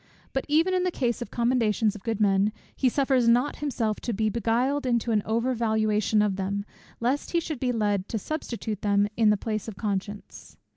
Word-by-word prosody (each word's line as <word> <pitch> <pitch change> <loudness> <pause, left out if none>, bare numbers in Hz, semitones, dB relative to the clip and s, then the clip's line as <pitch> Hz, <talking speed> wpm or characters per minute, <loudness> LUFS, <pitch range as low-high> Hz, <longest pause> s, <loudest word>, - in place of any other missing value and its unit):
But 270 - -1
even 325 +5 +3
in 365 - +2
the 365 - +1
case 245 -8 -1
of 240 - -5
the - - -15
commendations 230 -3 +2
of 210 - -10
good 225 0 -2
men, 200 0 +3 0.2
he 260 - +2
suffers 265 -2 +2
not 245 +4 +3
himself 235 -7 -1
to 235 - -3
be 215 +1 +1
beguiled 235 +6 0
into 235 -1 +1
an 215 -2 +3
over 230 +4 +1
valuation 215 -2 +1
of 200 -2 0
them, 200 +1 -2 0.3
lest 255 +8 -1
he 340 - +4
should 315 -5 -5
be 250 -1 0
led 205 -4 0
to 225 - -2
substitute 225 -5 -4
them 205 0 +2
in 225 -2 +4
the 210 - +3
place 215 +1 -3
of 215 -4 -7
conscience. 205 -1 -5
225 Hz, 205 wpm, -26 LUFS, 210-255 Hz, 0.3 s, he